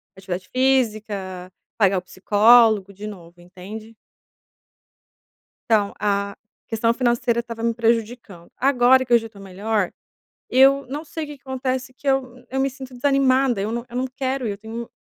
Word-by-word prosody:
atividade 185 -1 -6
física, 215 -8 -1 0.3
pagar 195 -3 +3
o - - -1
psicólogo 210 +2 +4
de 205 +2 -9
novo, 175 -3 -11
entende? 205 +5 -10 1.7
Então 210 -3 +2
a 200 -1 -1 0.3
questão 230 +1 +1
financeira 240 -1 +1
estava 230 -1 -7
me 230 0 +1
prejudicando, 230 -5 -2
agora 260 -1 +4
que 245 - -4
eu 235 - +8
já 225 0 -8
tô 205 -3 -16
melhor, 195 +1 -2 0.6
eu 270 +1 +5
não 295 +4 -5
sei 320 +1 -5
o - - -9
que 295 - -8
que - - -40
acontece 260 0 -3
que 280 - -16
eu 260 -2 0
n 250 - -21
eu 265 0 -1
me 275 0 +1
sinto 265 -1 -10
desanimada, 265 -3 +2
eu 210 +2 -2
não 235 0 -3
eu 240 - -8
não 260 +1 0
quero, 260 0 -3
eu 200 -1 -3
tenho 225 +2 -7
230 Hz, 170 wpm, -22 LUFS, 205-260 Hz, 1.7 s, eu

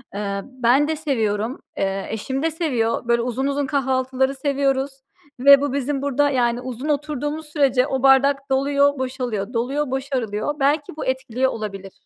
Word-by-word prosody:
Eee, 200 -1 -3
ben 260 +2 +2
de 315 - -1
seviyorum, 230 -6 -1 0.2
eee, 195 0 -1
eşim 265 +6 -3
de 325 - +1
seviyor. 245 -8 -1
Böyle 235 0 +3
uzun 250 +3 -1
uzun 280 0 0
kahvaltıları 265 -1 0
seviyoruz 275 0 0 0.5
ve 280 +2 +8
bu 285 -2 -1
bizim 280 0 -1
burada, 285 +1 +1
yani, 245 -3 +1
uzun 255 +3 -5
oturduğumuz 295 +1 -2
sürece 275 -3 +2
o 265 -1 -2
bardak 275 +1 +4
doluyor, 280 +1 +2
boşalıyor, 250 -4 -3
doluyor, 260 +4 -1
boşarılıyor. 260 -2 -2
Belki 290 +2 +1
bu - - -4
etkiliyor 260 0 0
olabilir. 195 -3 -6
265 Hz, 155 wpm, -22 LUFS, 240-280 Hz, 0.5 s, ve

